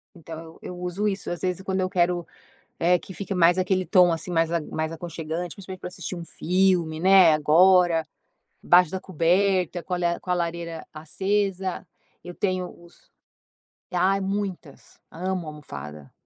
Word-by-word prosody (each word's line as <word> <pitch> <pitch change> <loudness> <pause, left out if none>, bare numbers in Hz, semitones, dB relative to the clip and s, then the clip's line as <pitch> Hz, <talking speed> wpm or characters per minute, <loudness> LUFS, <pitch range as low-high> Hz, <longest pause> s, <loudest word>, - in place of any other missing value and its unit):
Então, 165 -1 -10
eu 180 - -8
uso 180 +4 -2
isso 200 -1 -2
às 175 - -4
vezes 185 0 -2
quando 190 0 -2
eu 185 - 0
quero, 175 -1 +1 0.5
eh, 175 +1 +3
que 190 - -11
fique 195 +1 -5
mais 175 0 +4
aquele 185 0 +1
tom 180 -2 +5
assim, 165 +2 -3
mais 165 -1 +1 0.2
mais 160 +1 -2
aconchegante 165 +1 -5
principalmente 190 -2 -9
pra - - -5
assistir 180 0 -5
um 170 - -6
filme, 175 -3 +1
né, 185 -2 +7
agora, 165 +2 +4 0.6
embaixo 180 -1 +5
da 190 - -3
coberta, 185 0 +1
com 180 - -5
a - - +1
la 170 -1 0
com 180 - -12
a - - +4
lareira 170 -1 -3
acesa, 190 +4 -2 0.4
eu 175 0 -8
tenho 185 -2 -2
os 170 0 -19 0.8
Ai 190 +2 +2
muitas! 190 -6 -5
Amo 185 0 -3
almofada. 75 - -9
180 Hz, 160 wpm, -25 LUFS, 165-185 Hz, 0.8 s, né